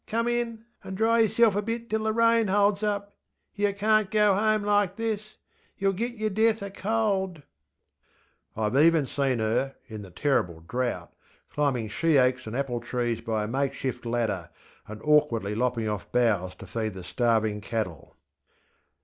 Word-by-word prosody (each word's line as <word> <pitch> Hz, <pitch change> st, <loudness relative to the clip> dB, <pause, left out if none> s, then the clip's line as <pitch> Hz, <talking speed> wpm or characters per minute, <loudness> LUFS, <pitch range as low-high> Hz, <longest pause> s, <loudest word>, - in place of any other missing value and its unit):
Come 230 Hz, +2 st, 0 dB
in! 235 Hz, -2 st, -2 dB, 0.2 s
and 190 Hz, 0 st, -6 dB
dry 230 Hz, +2 st, +3 dB
yerself 225 Hz, -1 st, +4 dB
a 205 Hz, -, +1 dB
bit 230 Hz, +2 st, -4 dB
till 220 Hz, 0 st, -1 dB
the 220 Hz, -, +2 dB
rain 230 Hz, 0 st, +3 dB
holds 200 Hz, +1 st, +2 dB
up. 205 Hz, -1 st, -2 dB, 0.4 s
Yer 205 Hz, 0 st, +1 dB
canŌĆÖt 215 Hz, 0 st, +2 dB
go 210 Hz, -2 st, +4 dB
home 215 Hz, +1 st, +2 dB
like 205 Hz, -2 st, +2 dB
this! 215 Hz, -1 st, -4 dB, 0.4 s
YerŌĆÖll 195 Hz, -1 st, +1 dB
git 235 Hz, +5 st, -2 dB
yer 215 Hz, -1 st, -1 dB
death 220 Hz, +2 st, +2 dB
oŌĆÖ 200 Hz, -1 st, -6 dB
cold. 195 Hz, -6 st, -1 dB, 1.1 s
ŌĆÖ 105 Hz, -1 st, 0 dB
IŌĆÖve 135 Hz, -, +4 dB
even 165 Hz, -3 st, +4 dB
seen 135 Hz, -1 st, 0 dB
her, 115 Hz, +5 st, 0 dB
in 110 Hz, -3 st, -7 dB
the 100 Hz, -, -10 dB
terrible 90 Hz, -, 0 dB
drought, 125 Hz, +2 st, -3 dB, 0.4 s
climbing 135 Hz, -6 st, 0 dB
she 155 Hz, +8 st, +2 dB
oaks 130 Hz, -2 st, +2 dB
and 110 Hz, -, -5 dB
apple 130 Hz, -3 st, -1 dB
trees 120 Hz, -1 st, -2 dB
by 110 Hz, -2 st, -1 dB
a -, -, -3 dB
makeshift 135 Hz, 0 st, -2 dB
ladder, 115 Hz, -7 st, -2 dB, 0.4 s
and 110 Hz, 0 st, -9 dB
awkwardly 145 Hz, -9 st, +2 dB
lopping 120 Hz, 0 st, 0 dB
off 105 Hz, -2 st, -4 dB
boughs 105 Hz, -7 st, +1 dB
to -, -, -11 dB
feed 110 Hz, +1 st, -3 dB
the 95 Hz, -, -8 dB
starving 110 Hz, 0 st, 0 dB
cattle. 100 Hz, -8 st, -4 dB
150 Hz, 165 wpm, -27 LUFS, -, 1.1 s, yerself